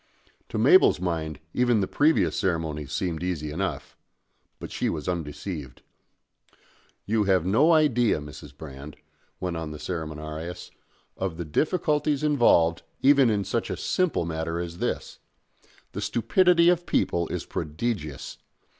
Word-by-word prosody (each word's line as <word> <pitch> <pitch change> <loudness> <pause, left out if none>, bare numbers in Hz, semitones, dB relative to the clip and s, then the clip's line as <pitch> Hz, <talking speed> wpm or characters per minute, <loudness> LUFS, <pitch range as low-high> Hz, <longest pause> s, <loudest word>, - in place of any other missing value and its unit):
To - - -4
Mabel's 370 - +6
mind 80 -3 -3
even 120 -3 +3
the 95 - 0
previous 110 - +2
ceremonies 80 -5 -2
seemed 80 +2 -2
easy 85 -5 -3
enough. 95 +4 -4 0.6
But - - -8
she - - -1
was 75 -2 -4
undeceived. 80 -3 -5 1.2
"You 105 0 +1
have 95 -3 +2
no 135 - +4
idea, 125 - +3
Mrs. 75 -1 -11
Brand," 75 0 -9 0.4
went 90 -2 -3
on 80 -1 -4
the 75 - -7
ceremoniarius, 80 0 -6 0.5
"of 95 -4 -3
the 85 - -4
difficulties 150 - 0
involved 115 - +4 0.2
even 140 -2 +6
in 105 -2 +1
such 105 +4 -2
a 95 - -3
simple 180 - 0
matter 80 0 -3
as 85 0 -6
this. - - -3 0.7
The - - -5
stupidity 170 - +3
of 175 0 +1
people 85 -1 +1
is - - -4
prodigious. 80 - -4
90 Hz, 135 wpm, -26 LUFS, 80-120 Hz, 1.2 s, Mabel's